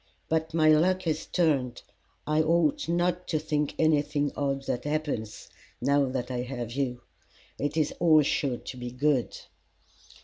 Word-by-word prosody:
But 160 0 0
my 155 -1 +4
luck 180 +5 +3
has 160 -2 -2
turned. 140 -8 0 0.4
I 155 +1 +2
ought 160 -1 +1
not 175 +1 0
to 160 - 0
think 150 -1 -1
anything 145 -2 +1
odd 140 -1 -1
that 125 -1 -3
happens 145 -8 -3 0.3
now 140 +2 +2
that 130 -1 -3
I 125 - -2
have 120 -2 -5
you. 125 -2 -2 0.6
It 145 +3 -2
is 155 -2 +1
all 155 -3 +5
sure 135 -3 0
to 130 - -9
be 125 0 -5
good." 130 +1 0
145 Hz, 150 wpm, -27 LUFS, 130-160 Hz, 0.6 s, all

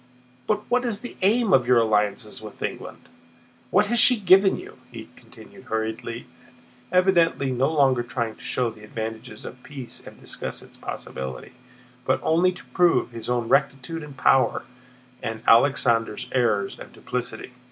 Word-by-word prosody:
But 210 -1 +1
what 250 +1 +2
is 230 -4 -2
the 245 - -8
aim 210 +1 +3
of 130 -5 +4
your 125 -1 +5
alliance 105 -3 +1
with - - -9
England? - - -6 0.6
What 205 +3 +4
has 235 +3 +1
she 250 0 +6
given 190 0 +5
you?" - - -11
he - - -9
continued - - -16
hurriedly, 110 +1 -4 0.7
evidently 170 -7 +3
no 130 +4 +1
longer 135 -5 +3
trying 115 -2 -3
to 130 - -16
show 125 -2 -1
the 110 -1 -15
advantages 110 +1 -6
of 125 - -9
peace 135 -4 -9
and - - -13
discuss - - -5
its - - -15
possibility, 65 -1 -7 0.5
but - - +1
only 170 +3 +3
to 180 -7 -13
prove 175 -8 +3
his 115 0 -7
own 120 -2 0
rectitude 140 +4 0
and 145 -3 -10
power 135 0 +3 0.6
and 110 0 -5
Alexander's 115 -3 +3
errors 115 -6 0
and - - -11
duplicity. 125 0 -4
130 Hz, 155 wpm, -24 LUFS, 115-180 Hz, 0.7 s, she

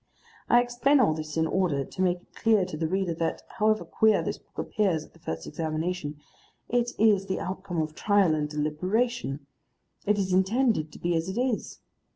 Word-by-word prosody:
I 240 0 +6
explain 245 +4 +2
all 200 -11 +4
this 155 0 -5
in 160 - +3
order 160 -5 0
to 185 - -6
make 180 -1 +1
it - - -32
clear 220 -4 +3
to 180 - -6
the 160 +1 -1
reader 185 0 0
that, 165 0 -2
however 215 0 +1
queer 220 -1 +3
this - - -3
book - - -33
appears 185 -9 0
at - - -22
the 165 - -20
first 80 - -5
examination, 160 -1 -3 0.5
it 240 0 +1
is 205 -3 +4
the 190 - -1
outcome 185 -2 -4
of 155 -1 -2
trial 200 -1 +3
and 150 -1 -1
deliberation, 155 - -1 0.6
it 210 0 +3
is 190 -2 0
intended 190 - +2
to - - -10
be 175 0 0
as 165 +3 -1
it 195 +5 -3
is. 250 -3 -2
185 Hz, 190 wpm, -27 LUFS, 155-215 Hz, 0.6 s, I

